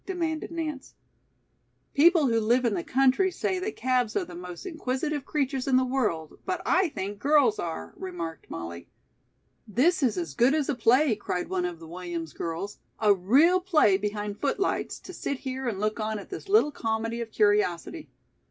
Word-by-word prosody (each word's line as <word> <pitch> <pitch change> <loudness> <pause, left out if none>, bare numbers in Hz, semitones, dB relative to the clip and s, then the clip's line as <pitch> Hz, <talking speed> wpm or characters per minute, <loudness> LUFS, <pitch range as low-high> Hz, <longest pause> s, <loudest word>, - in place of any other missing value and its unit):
demanded 330 -4 -2
Nance. 315 -5 -5 1.0
"People 325 +1 +5
who 230 -2 +2
live 240 +3 +2
in 230 - +2
the 175 -3 -2
country 270 +8 +3
say 370 0 -2
that 410 +4 -4
calves 250 -3 0
are - - 0
the 180 - -11
most 180 0 -8
inquisitive 295 -3 -2
creatures 270 -3 -1
in 265 - +3
the 260 - +3
world, 215 - -2
but 370 -2 -2
I 370 -1 +3
think 200 -6 -5
girls 280 -4 +3
are," 85 - -5
remarked 170 -4 -6
Molly. 85 +1 -7 0.8
"This 280 - +2
is 235 -7 +1
as 165 -5 -3
good 250 - +4
as 300 -2 0
a - - +2
play," 250 +1 +3
cried 180 -3 -3
one 185 -1 0
of 175 -1 -4
the 165 0 -12
Williams 170 -2 -6
girls, 170 +5 -5 0.2
"a 210 -2 +5
real 270 - +4
play 325 - +4
behind 205 +1 -3
footlights, 335 +7 -1
to 365 - -10
sit 280 - -3
here 260 -1 -4
and 210 -5 -2
look 215 +2 -1
on 215 0 -2
at 200 - -10
this 385 +1 -7
little 405 -7 +5
comedy 225 -2 -2
of 230 - -5
curiosity. 210 - +1
235 Hz, 180 wpm, -27 LUFS, 190-295 Hz, 1.0 s, People